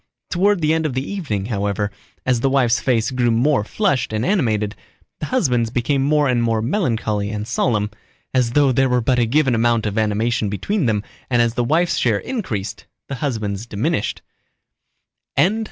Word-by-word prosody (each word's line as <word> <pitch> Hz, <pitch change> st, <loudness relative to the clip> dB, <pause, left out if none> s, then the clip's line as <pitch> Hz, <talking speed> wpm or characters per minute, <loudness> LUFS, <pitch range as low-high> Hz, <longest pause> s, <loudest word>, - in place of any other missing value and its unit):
Toward 195 Hz, +1 st, +2 dB
the 155 Hz, 0 st, +3 dB
end 160 Hz, -1 st, +1 dB
of 130 Hz, -, -5 dB
the 130 Hz, +2 st, -2 dB
evening, 135 Hz, -, -3 dB
however, 105 Hz, -2 st, -1 dB, 0.3 s
as 125 Hz, -2 st, +2 dB
the 135 Hz, -, +1 dB
wife's 125 Hz, -4 st, +3 dB
face 120 Hz, -3 st, +1 dB
grew 125 Hz, -2 st, +1 dB
more 120 Hz, +1 st, +2 dB
flushed 135 Hz, -, 0 dB
and 110 Hz, +2 st, -1 dB
animated, 110 Hz, -, +1 dB, 0.4 s
the 155 Hz, -, -3 dB
husband's 125 Hz, -, +1 dB
became 125 Hz, +4 st, 0 dB
more 145 Hz, +1 st, +3 dB
and 125 Hz, -2 st, +2 dB
more 115 Hz, -1 st, +1 dB
melancholy 110 Hz, -, -1 dB
and 105 Hz, 0 st, -4 dB
solemn, 105 Hz, -4 st, 0 dB, 0.4 s
as 125 Hz, -3 st, +1 dB
though 145 Hz, -1 st, +4 dB
there 130 Hz, +1 st, +2 dB
were 125 Hz, 0 st, +2 dB
but 125 Hz, +1 st, +1 dB
a 120 Hz, -, +2 dB
given 135 Hz, +1 st, +2 dB
amount 115 Hz, -1 st, +2 dB
of 105 Hz, +1 st, -1 dB
animation 110 Hz, 0 st, 0 dB
between 160 Hz, -, -1 dB
them 105 Hz, -2 st, 0 dB, 0.3 s
and 120 Hz, -2 st, +2 dB
as 120 Hz, -1 st, +2 dB
the 120 Hz, -, 0 dB
wife's 165 Hz, +7 st, +1 dB
share 115 Hz, -4 st, +2 dB
increased 120 Hz, -, -4 dB, 0.2 s
the 140 Hz, -, -3 dB
husband's 110 Hz, -6 st, -2 dB
diminished. 105 Hz, +1 st, -2 dB
120 Hz, 175 wpm, -20 LUFS, 110-140 Hz, 0.4 s, though